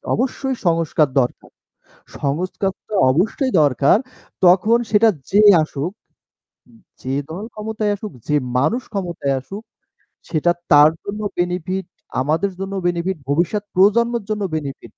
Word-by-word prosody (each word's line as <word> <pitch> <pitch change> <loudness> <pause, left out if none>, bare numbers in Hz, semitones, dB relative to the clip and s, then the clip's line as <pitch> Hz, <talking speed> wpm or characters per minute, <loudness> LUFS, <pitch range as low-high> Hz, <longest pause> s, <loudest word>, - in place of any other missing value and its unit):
অবশ্যই 265 +2 -2
সংস্কার 165 -2 +2
দরকার। 125 - -4 0.7
সংস্কারটা 185 +7 -3 0.2
অবশ্যই 220 - 0
দরকার, 140 +3 +4 0.5
তখন 190 +6 +5
সেটা 220 +1 +5 0.2
যে 205 - +5 0.2
আসুক 155 +2 -4 1.1
যে 130 - -3 0.2
দল 185 +6 -6
ক্ষমতায় 215 -1 -2
আসুক, 205 -2 -8 0.2
যে 150 - +1 0.2
মানুষ 220 - +1
ক্ষমতায় 170 -8 -2
আসুক 200 +10 -9 0.7
সেটা 165 +1 +2 0.2
তার 150 +1 +8
জন্য 210 +1 -5 0.2
বেনিফিট 180 +2 -2 0.4
আমাদের 160 +8 0
জন্য 195 0 -4
বেনিফিট, 175 +2 -1
ভবিষ্যৎ 175 +8 0
প্রজন্মের 230 +4 +3
জন্য 210 -1 -1
বেনিফিট। 140 -3 -7
185 Hz, 115 wpm, -20 LUFS, 155-210 Hz, 1.1 s, তার